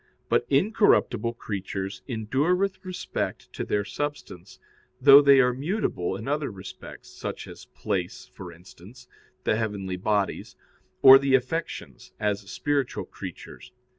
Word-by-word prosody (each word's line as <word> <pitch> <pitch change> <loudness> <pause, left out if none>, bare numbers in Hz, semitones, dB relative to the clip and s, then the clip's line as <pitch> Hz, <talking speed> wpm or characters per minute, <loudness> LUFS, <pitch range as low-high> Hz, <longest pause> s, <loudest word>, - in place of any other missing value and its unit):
But 120 - +1
incorruptible 140 - +2
creatures 95 -3 -5
endure 135 +8 0
with 195 +1 -2
respect 185 -1 -5
to - - -4
their 105 -1 -1
substance, 125 -10 -6 0.4
though 140 +1 +9
they 140 -1 +6
are 125 -1 +4
mutable 135 - -2
in 110 +5 -7
other 145 0 -1
respects, 95 -2 -11
such - - -7
as - - -12
place, 95 -4 -4
for 90 -3 -9
instance, 90 +6 -16 0.4
the 110 - +1
heavenly 100 -4 -3
bodies; 100 +1 -1 0.5
or 135 0 +11
the 135 -1 +3
affections, 135 +6 -4
as 105 -1 -1
spiritual 145 -3 -2
creatures. - - -10
120 Hz, 130 wpm, -26 LUFS, 100-140 Hz, 0.5 s, or